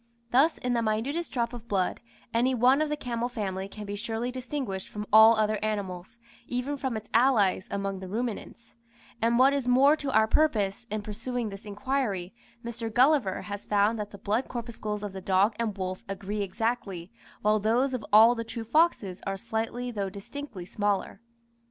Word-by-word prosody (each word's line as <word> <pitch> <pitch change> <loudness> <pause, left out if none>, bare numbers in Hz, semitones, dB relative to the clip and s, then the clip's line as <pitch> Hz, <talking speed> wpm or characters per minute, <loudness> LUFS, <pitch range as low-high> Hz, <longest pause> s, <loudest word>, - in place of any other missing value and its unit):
Thus, 285 +6 +4
in 250 0 -1
the 235 - +1
minutest 230 +10 -1
drop 235 -2 -1
of 235 -1 -9
blood, 190 -4 0 0.3
any 250 +3 +2
one 255 +4 +4
of 310 - 0
the 300 - -1
camel 240 -3 -2
family 195 -5 -3
can 210 +1 -9
be 205 0 -4
surely 225 +3 -3
distinguished 255 -6 -4
from 210 0 -5
all 220 +1 +9
other 215 -1 0
animals, 200 -2 -4 0.3
even 250 +4 -2
from 265 -5 -2
its 215 - -8
allies 225 -7 +3
among 195 -1 -3
the 190 - -7
ruminants; 230 +2 -5 0.5
and 230 +1 +3
what 265 +2 +6
is 275 -3 -1
more 270 +4 +6
to 285 -2 -4
our 220 -2 +5
purpose, 220 -7 +1
in 215 0 -3
pursuing 230 +2 -3
this 195 +1 -10
inquiry, 205 -4 -2 0.3
Mr. 230 -1 -4
Gulliver 250 -5 +3
has 205 -1 -6
found 210 +2 +2
that 210 -1 -4
the 200 - -11
blood 215 +6 -1
corpuscles 220 -3 -5
of 205 -2 -5
the 190 - -6
dog 195 +4 +3
and 215 -3 -1
wolf 185 -1 -4
agree 200 +1 -3
exactly, 195 -3 -3 0.3
while 215 +1 +3
those 240 +6 +1
of 250 -4 -3
all 220 +3 +8
the 230 -1 -4
true 230 0 -6
foxes 230 - +2
are 195 0 -2
slightly 230 +3 -3
though 200 -4 -2
distinctly 200 0 -8
smaller. 205 +1 -1
220 Hz, 180 wpm, -28 LUFS, 200-245 Hz, 0.5 s, all